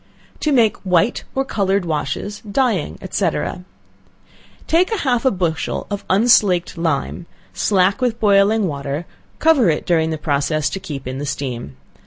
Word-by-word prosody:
To 305 Hz, -, 0 dB
Make 235 Hz, -6 st, +3 dB
White 185 Hz, +4 st, +1 dB
or 270 Hz, 0 st, 0 dB
Colored 195 Hz, -5 st, 0 dB
Washes, 165 Hz, +6 st, -3 dB
Dyeing, 220 Hz, -, 0 dB
&c. 190 Hz, -4 st, +2 dB, 1.4 s
Take 365 Hz, +6 st, +2 dB
half 250 Hz, -2 st, 0 dB
a -, -, +6 dB
bushel 175 Hz, -7 st, -2 dB
of 200 Hz, 0 st, -3 dB
unslaked 190 Hz, -4 st, +3 dB
lime, 165 Hz, 0 st, -2 dB, 0.3 s
slack 195 Hz, +3 st, +2 dB
with 240 Hz, -2 st, 0 dB
boiling 205 Hz, +1 st, +4 dB
water, 145 Hz, 0 st, -3 dB, 0.3 s
covering 255 Hz, -, +4 dB
it -, -, -10 dB
during 160 Hz, -2 st, +2 dB
the 160 Hz, -, -2 dB
process 145 Hz, -1 st, 0 dB
to 195 Hz, -, -4 dB
keep 145 Hz, -9 st, -7 dB
in 130 Hz, +1 st, -4 dB
the 145 Hz, -, -3 dB
steam. 125 Hz, -, -5 dB
185 Hz, 145 wpm, -19 LUFS, 155-220 Hz, 1.4 s, a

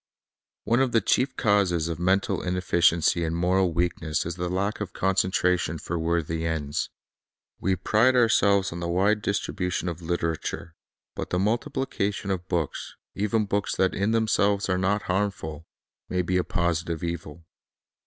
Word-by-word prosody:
One 115 Hz, +3 st, +2 dB
of 130 Hz, -2 st, +1 dB
the 115 Hz, -, +5 dB
chief 130 Hz, 0 st, +1 dB
causes 100 Hz, -7 st, +2 dB
of 85 Hz, -1 st, -4 dB
mental 95 Hz, +3 st, +1 dB
inefficiency 85 Hz, -2 st, +2 dB
and 80 Hz, 0 st, -1 dB
moral 90 Hz, +1 st, +2 dB
weakness 85 Hz, -2 st, -1 dB
is 85 Hz, -, -3 dB
the 90 Hz, +1 st, -3 dB
lack 100 Hz, +4 st, -1 dB
of 95 Hz, -3 st, -4 dB
concentration 90 Hz, -3 st, +1 dB
for 85 Hz, +2 st, -4 dB
worthy 80 Hz, -1 st, -1 dB
ends. 75 Hz, -3 st, -2 dB, 0.7 s
We 95 Hz, +1 st, +1 dB
pride 110 Hz, +8 st, +3 dB
ourselves 100 Hz, -5 st, +3 dB
on 85 Hz, -, -6 dB
the 85 Hz, -, -3 dB
wide 100 Hz, +5 st, +2 dB
distribution 90 Hz, -3 st, -2 dB
of 85 Hz, -1 st, -4 dB
literature; 85 Hz, 0 st, -3 dB, 0.4 s
but -, -, -5 dB
the 90 Hz, -, 0 dB
multiplication 105 Hz, -2 st, -1 dB
of 90 Hz, -1 st, -3 dB
books, 85 Hz, -5 st, -3 dB, 0.2 s
even 105 Hz, +2 st, 0 dB
books 100 Hz, 0 st, -1 dB
that 95 Hz, -1 st, +2 dB
in 100 Hz, +2 st, 0 dB
themselves 105 Hz, -3 st, +2 dB
are 90 Hz, 0 st, +1 dB
not 100 Hz, +3 st, +1 dB
harmful, 90 Hz, -5 st, -2 dB, 0.4 s
may 90 Hz, 0 st, 0 dB
be 90 Hz, +1 st, 0 dB
a 90 Hz, -, +2 dB
positive 85 Hz, -1 st, -1 dB
evil. 85 Hz, -1 st, -5 dB
90 Hz, 155 wpm, -26 LUFS, 85-100 Hz, 0.7 s, the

